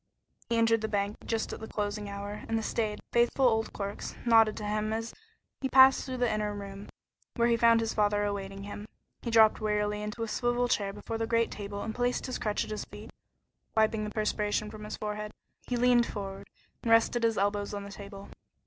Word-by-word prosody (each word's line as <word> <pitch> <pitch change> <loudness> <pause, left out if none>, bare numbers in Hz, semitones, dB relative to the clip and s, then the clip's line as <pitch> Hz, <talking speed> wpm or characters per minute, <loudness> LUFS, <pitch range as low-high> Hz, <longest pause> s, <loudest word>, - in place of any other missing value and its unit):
He 235 - +1
entered 225 -1 +3
the 220 - -1
bank 205 0 -1
just 225 -1 -1
at - - -6
the 220 - -7
closing 205 -1 -3
hour, 200 +1 -6
and 225 - +1
the 225 - -2
staid, 215 -1 -1
faithful 240 +2 +4
old 225 -2 +1
clerks 200 0 -5
nodded 225 -2 +5
to 210 - -5
him 215 +1 -1
as 225 +1 -3 0.5
he 265 - -1
passed 265 0 +7
through 260 - -5
to 250 - -6
the 240 -3 +2
inner 210 -1 -1
room, 200 0 -8 0.5
where 235 -1 +3
he 235 - +4
found 230 0 +5
his 225 -1 -1
father 205 -1 +2
awaiting 195 -1 -4
him. 205 +1 -7 0.3
He 235 - -4
dropped 220 -2 +5
wearily 210 -1 0
into 210 +2 -4
a - - -2
swivel 240 +2 0
chair 200 -4 0
before 210 +3 -5
the 225 - -1
great 230 0 +2
table 200 0 -5
and 220 - -4
placed 245 +1 0
his 255 - -4
crutch 210 -1 0
at - - -8
his 215 - -4
feet; - - -11 0.7
wiping 220 0 +3
the 210 - -3
perspiration 210 0 -1
from 215 -1 -9
his 210 - -5
forehead, 210 0 -4 0.3
he 245 - -1
leaned 240 -1 +4
forward, 195 -2 -6 0.3
and 230 - -3
rested 230 +1 +4
his 225 -1 +2
elbows 205 +1 0
on 205 -1 -4
the 200 - -9
table. 200 -1 -10
215 Hz, 215 wpm, -30 LUFS, 205-230 Hz, 0.7 s, passed